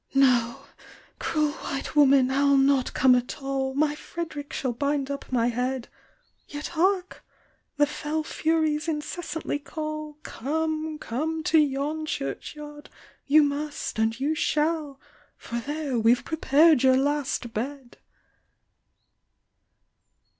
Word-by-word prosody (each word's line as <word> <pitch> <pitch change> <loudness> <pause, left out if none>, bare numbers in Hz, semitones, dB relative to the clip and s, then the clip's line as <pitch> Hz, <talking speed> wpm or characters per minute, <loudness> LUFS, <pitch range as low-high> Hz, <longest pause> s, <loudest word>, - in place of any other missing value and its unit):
"No! 255 0 +3 0.5
cruel 305 -2 0
white 275 -1 -5
woman, 275 -3 +5
I'll 280 +1 +4
not 270 -1 +3
come 255 -1 +5
at 250 +2 -1
all, 270 -1 -2
My 295 +1 +2
Fred'rick 305 -2 -6
shall 255 -3 -2
bind 280 +2 -1
up 280 -1 -6
my 240 -2 +2
head; 250 +1 -2 0.6
Yet 295 0 -6
hark! 365 +2 0 0.5
the 290 - +5
fell 300 +1 -3
furies 315 0 0
incessantly 310 -1 -3
call, 305 0 -6
Come, 315 +3 -2
come 315 +5 -3
to 320 +1 +4
yon 300 +2 0
church 135 - -4
yard, 295 0 -10 0.4
you 300 +2 +6
must, 290 -4 -3
and 225 +2 +1
you 290 +4 +1
shall, 305 -2 0 0.4
For 235 - -5
there 285 -1 -2
we've 230 +2 +3
prepar'd 315 -2 +4
your 260 -1 +5
last 275 -4 -1
bed!" 260 +3 -5
290 Hz, 120 wpm, -26 LUFS, 265-310 Hz, 0.6 s, you